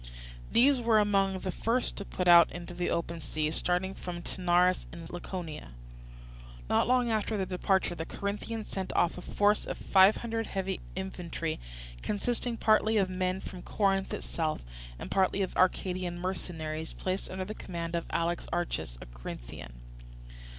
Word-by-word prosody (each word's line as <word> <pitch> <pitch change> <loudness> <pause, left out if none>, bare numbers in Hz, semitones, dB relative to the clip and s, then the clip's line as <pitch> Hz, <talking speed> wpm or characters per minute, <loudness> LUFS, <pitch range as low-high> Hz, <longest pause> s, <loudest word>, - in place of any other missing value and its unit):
These 260 +2 +5
were 230 -2 +4
among 195 -2 +3
the 185 - -2
first 235 +6 0
to 200 - -4
put 180 -2 -2
out 170 -1 +8
into 175 0 -7
the 175 0 -1
open 170 0 -2
sea, 155 -1 -1
starting 180 +3 +1
from 175 -2 -6
Taenarus 180 0 +2
in 170 0 -8
Laconia. 170 - -6 0.9
Not - - +3
long 250 -1 +3
after 215 0 0
their 190 - 0
departure 185 0 +1
the 160 - -4
Corinthians 210 +2 -4
sent 190 -1 -3
off 175 - +2
a - - -7
force 205 +3 +2
of - - -3
five 190 +2 +5
hundred 225 -1 -2
heavy 190 -1 -2 0.2
infantry, 175 -4 -3 0.4
consisting 235 +3 -1
partly 215 0 +4
of 190 -2 +2
men 185 0 -1
from 180 - -8
Corinth 195 -1 +1
itself, 155 -2 -2 0.3
and - - -7
partly 195 +1 +2
of 185 - -4
Arcadian 180 -1 +1
mercenaries, 160 -3 -3
placed 185 +1 -3
under 185 0 -3
the 210 - -5
command 170 -5 -5
of 170 - -2
Alexarchus, 170 - -2
a - - -10
Corinthian. - - -8
185 Hz, 155 wpm, -30 LUFS, 170-200 Hz, 0.9 s, out